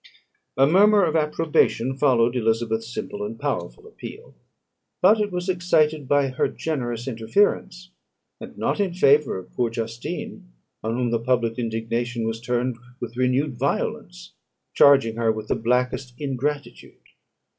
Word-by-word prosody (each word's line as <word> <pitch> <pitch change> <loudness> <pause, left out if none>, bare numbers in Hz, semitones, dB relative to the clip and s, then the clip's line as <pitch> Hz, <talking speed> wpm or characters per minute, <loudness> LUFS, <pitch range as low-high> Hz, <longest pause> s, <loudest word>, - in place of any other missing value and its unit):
A 135 - +6
murmur 200 +5 +5
of 160 -1 -1
approbation 150 -5 +1
followed 125 -3 +2
Elizabeth's 115 -1 -1
simple 205 +10 -5
and 215 +2 -6
powerful 435 - -4
appeal; 445 +1 -11 0.7
but 210 +4 +5
it 205 -1 -1
was 180 0 -3
excited 160 -5 +1
by 145 -1 +2
her 130 - 0
generous 120 -6 -4
interference, 180 - 0 0.5
and - - -10
not - - -1
in 190 -4 0
favour 145 - +4
of 90 -1 -11
poor 120 -2 0
Justine, 115 - -6 0.3
on 110 +1 -1
whom 125 -2 0
the 115 - +1
public 115 -1 0
indignation 115 +1 -2
was 115 0 -3
turned 125 0 -1 0.2
with 120 -1 -6
renewed 130 +1 0
violence, - - -3 0.4
charging 135 -6 +5
her 115 -1 +2
with 110 -1 -6
the - - +2
blackest 125 +2 -1
ingratitude. 145 +1 -4
130 Hz, 140 wpm, -23 LUFS, 115-155 Hz, 0.7 s, A